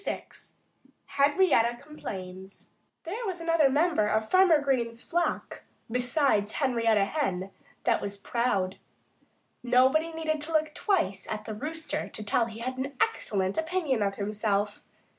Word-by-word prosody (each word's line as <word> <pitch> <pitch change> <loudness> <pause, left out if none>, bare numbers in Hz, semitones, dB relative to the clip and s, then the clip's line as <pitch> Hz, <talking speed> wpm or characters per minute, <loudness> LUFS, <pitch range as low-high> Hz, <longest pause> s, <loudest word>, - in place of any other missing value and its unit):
VI - - -3 0.8
HENRIETTA 280 -5 +3
COMPLAINS 190 -10 -9 0.3
There 410 +8 -5
was 365 -2 -3
another 330 -4 +3
member 300 -5 +2
of 220 +1 0
Farmer 370 -2 +5
Green's 240 -5 -1
flock, 345 +1 -2 0.3
besides 250 -4 +1
Henrietta 230 -7 +2
Hen, 195 -8 -2 0.3
that - - +2
was 200 0 -5
proud. 200 -4 -1 0.8
Nobody 260 +6 +3
needed 315 -2 -2
to 320 +2 -5
look 310 -1 +1
twice 330 - 0
at 215 -1 -4
the 220 - -5
Rooster 300 +5 -4
to 215 - -7
tell 220 +3 +2
that 230 - -8
he 225 - -9
had 255 +2 -4
an 275 +1 -4
excellent 190 +4 0
opinion 320 -7 0
of 200 -1 0
himself. 205 0 -1
250 Hz, 140 wpm, -28 LUFS, 210-310 Hz, 0.8 s, Farmer